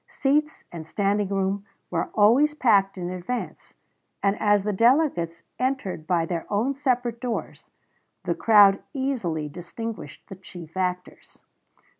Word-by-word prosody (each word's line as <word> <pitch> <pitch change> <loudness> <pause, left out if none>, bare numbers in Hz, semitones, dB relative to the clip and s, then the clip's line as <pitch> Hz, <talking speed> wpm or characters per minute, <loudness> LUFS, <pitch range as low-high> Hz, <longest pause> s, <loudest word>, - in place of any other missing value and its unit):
Seats 300 +3 0
and 160 -2 -8
standing 200 +3 0
room 195 0 -1 0.3
were - - -1
always 250 +9 +4
packed 200 -8 +3
in 180 -1 -4
advance, 185 +7 -6 0.5
and, 200 0 +2
as 205 -2 +3
the 210 0 -1
delegates 200 - +2 0.2
entered 250 - -2
by 170 -2 +1
their 165 0 -4
own 225 +7 +1
separate 250 -4 -1
doors, 245 -3 -5 0.5
the - - 0
crowd 205 -3 +5
easily 225 - -2
distinguished 180 +8 -8
the 195 - -9
chief 175 -3 -12
actors. 180 -1 -4
205 Hz, 130 wpm, -25 LUFS, 180-245 Hz, 0.5 s, crowd